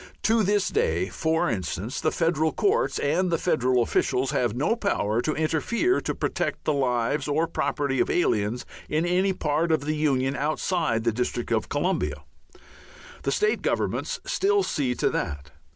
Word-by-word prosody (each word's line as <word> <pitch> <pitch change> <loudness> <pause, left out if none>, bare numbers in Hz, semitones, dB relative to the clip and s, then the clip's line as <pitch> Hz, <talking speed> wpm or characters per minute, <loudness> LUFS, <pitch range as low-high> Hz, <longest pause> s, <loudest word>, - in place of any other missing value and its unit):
To 225 +1 +3
this 205 0 +2
day, 85 +4 0
for 160 0 0
instance, 100 +2 -3
the 155 - +2
federal 160 -2 +1
courts 435 +4 +1
and 175 +6 +1
the 165 - +1
federal 130 -8 +2
officials 130 +2 0
have 120 -6 0
no 150 - +1
power 120 - 0
to 155 +4 -1
interfere 230 - +1
to - - -3
protect - - -2
the 155 - +1
lives 130 +1 0
or 150 +3 +1
property 140 -4 -1
of - - +2
aliens 115 -8 0 0.2
in 155 +2 +1
any 185 +2 +2
part 160 -1 0
of 155 -3 +1
the 155 +1 0
union 135 -3 +1
outside 150 -3 0
the 115 - +2
district 120 +1 -3
of 110 -2 0
Columbia. 180 +6 -1 1.0
The - - -1
state 425 +1 +1
governments - - -1
still 410 -4 +2
see 135 - -1
to - - +1
that. 70 0 -4
150 Hz, 165 wpm, -25 LUFS, 125-175 Hz, 1.0 s, To